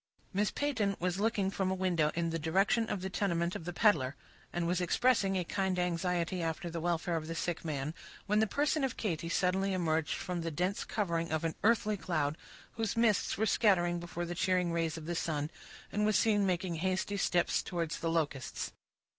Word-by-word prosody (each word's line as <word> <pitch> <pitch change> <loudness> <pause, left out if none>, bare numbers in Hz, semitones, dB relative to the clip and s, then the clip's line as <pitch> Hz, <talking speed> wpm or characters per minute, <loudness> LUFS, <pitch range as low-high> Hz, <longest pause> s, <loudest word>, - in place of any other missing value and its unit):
Miss 200 +1 +2
Peyton 220 -9 0
was 180 +1 -1
looking 205 -3 +1
from 190 -1 0
a 190 - 0
window 175 -5 +2
in 170 0 0
the 165 - -1
direction 195 +8 +2
of 190 - -2
the 190 - -3
tenement 170 -3 0
of 160 - -6
the 175 - -3
peddler, 155 - +3 0.4
and 175 -1 -1
was 180 +1 +1
expressing 195 0 +2
a 180 - 0
kind 190 +1 -1
anxiety 180 0 0
after 165 +1 -2
the 165 - -3
welfare 170 0 0
of 155 -1 -5
the 165 - -4
sick 170 0 -2
man, 150 -1 -2 0.3
when 210 +1 +2
the 220 - +3
person 290 +5 +1
of 265 - -1
Katy 170 -5 -2
suddenly 190 +3 +1
emerged 160 -4 0
from 180 -1 -3
the 165 - -2
dense 180 +5 -1
covering 170 -6 -1
of 155 0 0
an 165 -1 0
earthly 215 -1 +3
cloud, 155 -5 -1 0.4
whose 225 -1 -1
mists 225 -4 +2
were 220 - +2
scattering 175 -6 +3
before 175 0 -4
the 175 - -4
cheering 180 0 +1
rays 165 -1 -1
of 160 - -7
the 175 - -2
sun, 155 -2 -2 0.4
and 210 - 0
was 215 0 +4
seen 205 -3 +3
making 180 -2 -1
hasty 185 +3 -1
steps 180 -3 +2
towards 170 -3 -3
the 165 - -1
Locusts. 150 -5 -2
180 Hz, 200 wpm, -32 LUFS, 165-195 Hz, 0.4 s, was